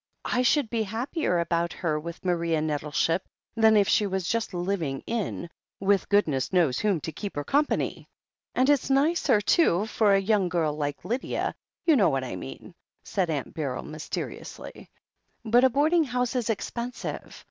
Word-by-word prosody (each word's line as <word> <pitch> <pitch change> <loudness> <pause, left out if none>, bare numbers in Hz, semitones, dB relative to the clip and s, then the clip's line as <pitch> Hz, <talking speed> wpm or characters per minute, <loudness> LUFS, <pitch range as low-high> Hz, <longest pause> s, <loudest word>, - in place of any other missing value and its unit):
"I 250 - +1
should 255 -1 +2
be 230 -2 0
happier 225 - -1
about 170 0 0
her 155 -3 -1
with 170 +3 -8
Maria 170 -3 +1
Nettle 150 -1 -2
ship 165 +4 +1 0.3
than 220 -1 +5
if 200 -2 +4
she 210 - +3
was 190 -3 -2
just 230 +1 -1
living 175 -7 -2
in' 220 -6 -3 0.3
with 200 0 +1
goodness 155 -11 +2
knows 170 -9 +2
whom 205 -5 +1
to 160 - -4
keep 200 +6 -6
her 145 - -2
company. 290 - 0 0.5
And 255 - +3
it's 290 -2 +2
nicer, 275 -5 +3
too, 205 - +3
for 215 -2 +3
a - - +4
young 195 -2 +1
girl 165 -3 0
like 145 -1 -4
Lydia 245 +4 -2 0.2
— - - -46
^you 320 - +6
know 205 -8 +4
what 135 -2 -1
I 125 -7 -5
mean," 65 -6 -9 0.3
said 185 -4 -1
Aunt 145 -4 -3
Beryl 140 -5 -3
mysteriously. 155 0 -7 0.6
"But 240 +3 +4
a - - +6
boarding 310 +6 +3
house 250 -1 -1
is 245 -3 -1
expensive. 235 +3 -4
195 Hz, 175 wpm, -26 LUFS, 160-235 Hz, 0.6 s, ^you